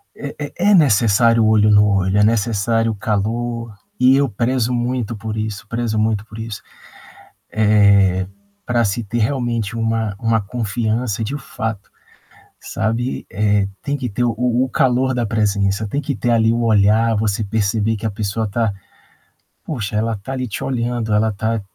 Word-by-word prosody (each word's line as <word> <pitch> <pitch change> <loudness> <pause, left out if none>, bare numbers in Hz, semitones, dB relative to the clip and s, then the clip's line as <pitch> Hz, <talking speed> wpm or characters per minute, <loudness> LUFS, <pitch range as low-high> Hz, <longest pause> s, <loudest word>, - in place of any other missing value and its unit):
é 140 0 -7
é 145 - -5 0.2
é - - +6
necessário 115 - +4
olho 105 -1 +4
no 105 0 +6
olho, 95 0 +1
é 105 - +5
necessário 115 +1 +1
calor, 115 +2 -2 0.3
e 130 +1 +5
eu 140 -1 +2
prezo 120 +3 0
muito 120 -2 -2
por 110 +1 -5
isso, 110 -1 -4
prezo 115 -1 -2
muito 110 -1 0
por 110 -1 -12
isso. 110 -2 -6 0.9
Eh, 100 -3 +3 0.4
pra 120 -1 +1
se 105 +3 -1
ter 120 +4 -3
realmente 115 -3 -1
uma 115 -2 -1
uma 115 -1 +1
confiança 110 +1 -2
de 140 +7 -3
fato, 110 -5 -5 0.7
sabe, 115 +4 -3
eh, 105 -1 +1 0.2
tem 140 0 -1
que 125 -3 -4
ter 120 +4 -2
o 115 - +1 0.3
o - - -8
calor 130 +2 +2
da 120 -2 -1
presença, 100 -1 0
tem 140 +7 -2
que 140 -4 -3
ter 120 +3 -1
ali 115 -1 +3
o 120 0 0
olhar, 110 +1 +3
você 105 0 0
perceber 105 +1 0
que 110 - -7
a 110 - 0
pessoa 105 +1 -2
tá 110 0 -1 0.9
poxa 110 -8 -4
ela 110 +1 0
tá 115 +7 -7
ali 130 -1 -3
te 105 - -5
olhando, 120 -3 -2
ela 110 +1 +2
tá 110 +2 -2
110 Hz, 165 wpm, -19 LUFS, 105-120 Hz, 0.9 s, é